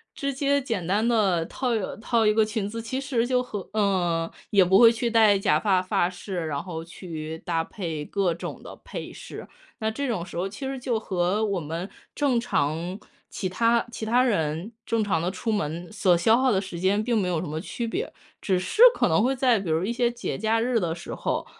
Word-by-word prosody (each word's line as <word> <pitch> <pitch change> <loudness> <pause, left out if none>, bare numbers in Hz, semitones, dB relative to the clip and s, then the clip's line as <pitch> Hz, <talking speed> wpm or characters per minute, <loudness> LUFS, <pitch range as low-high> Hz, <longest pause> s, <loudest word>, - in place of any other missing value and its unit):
直 280 -2 -2
接 280 +1 +1
简 225 -9 -3
单 210 +4 +1
地 195 -8 +2
套 255 +8 -3 0.3
套 225 +1 +1
一 210 - +4
个 220 0 +4
裙 215 -2 -2
子。 230 +2 -5
其 260 +4 -3
实 260 -4 0
就 250 0 +2
和 205 -6 -7
嗯， 175 -6 +1 0.2
也 200 -2 +5
不 190 +2 +5
会 230 -1 +9
去 235 +1 -1
戴 215 -3 +5
假 195 - +2
发 190 -3 +2
发 180 -1 +1
饰， 180 -2 -5
然 145 -2 -2
后 165 -3 -6
去 160 -2 -7
搭 165 -2 0
配 165 -4 -5
各 195 -4 0
种 - - -7
的 - - -9
配 - - -7
饰。 - - -9 0.3
那 220 - 0
这 280 +5 -3
种 215 -9 -2
时 175 - -11
候， 185 - -1
其 205 +7 -7
实 265 -1 -4
就 240 -3 -1
和 190 +1 0
我 200 -3 -1
们 165 +4 -5 0.3
正 275 -5 +2
常 170 -3 -1 0.3
其 185 - -3
他 230 +5 +2
其 220 -1 -5
他 245 +3 +3
人 165 -3 -1
正 225 -1 +1
常 190 -6 0
地 175 - 0
出 195 +4 -3
门 175 -2 -3
所 185 -4 +3
消 220 +7 +4
耗 260 0 +3
的 195 -4 +2
时 180 -3 -7
间 200 +3 +2
并 235 0 +1
没 190 - +1
有 170 -3 0
什 180 - -5
么 155 +1 -3
区 230 +6 -4
别。 430 - -3 0.3
只 190 -2 +1
是 185 - -1
可 - - +2
能 165 +7 +3
会 265 +2 +2
在 250 -4 +3
比 190 -3 -5
如 160 +2 +1
一 215 - -1
些 240 0 +1
节 240 - -4
假 220 +2 +1
日 240 -1 +1
的 170 -3 -1
时 170 - -8
候， - - -2
205 Hz, 240 characters per minute, -25 LUFS, 175-235 Hz, 0.3 s, 会